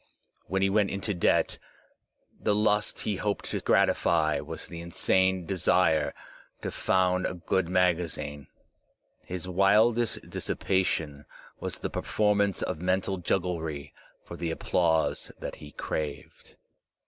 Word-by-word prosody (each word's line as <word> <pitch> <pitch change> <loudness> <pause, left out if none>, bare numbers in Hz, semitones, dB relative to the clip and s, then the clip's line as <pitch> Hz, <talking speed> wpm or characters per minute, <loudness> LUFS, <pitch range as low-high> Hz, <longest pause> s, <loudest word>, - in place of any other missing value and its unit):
When 95 +2 0
he 100 - +3
went 105 -1 +3
into 100 +2 -2
debt, 90 - +2 0.8
the 105 - +1
lust 105 0 +1
he 105 -3 -1
hoped 100 +1 -2
to - - -1
gratify 80 -3 +3
was - - -6
the 85 -1 -8
insane 95 +2 +2
desire 90 -2 +2 0.5
to - - -2
found 90 0 +2
a - - -4
good 90 0 0
magazine. 85 -6 0 0.8
His 90 0 -5
wildest 105 +5 +3
dissipation 80 -6 -1 0.3
was - - -3
the - - -4
performance 100 -2 +1
of 80 - -3
mental 95 +1 0
jugglery 80 -6 -2 0.3
for - - -9
the 85 - -3
applause 80 0 +1
that - - -6
he 75 - -11
craved. 75 -2 -5
90 Hz, 125 wpm, -28 LUFS, 80-100 Hz, 0.8 s, he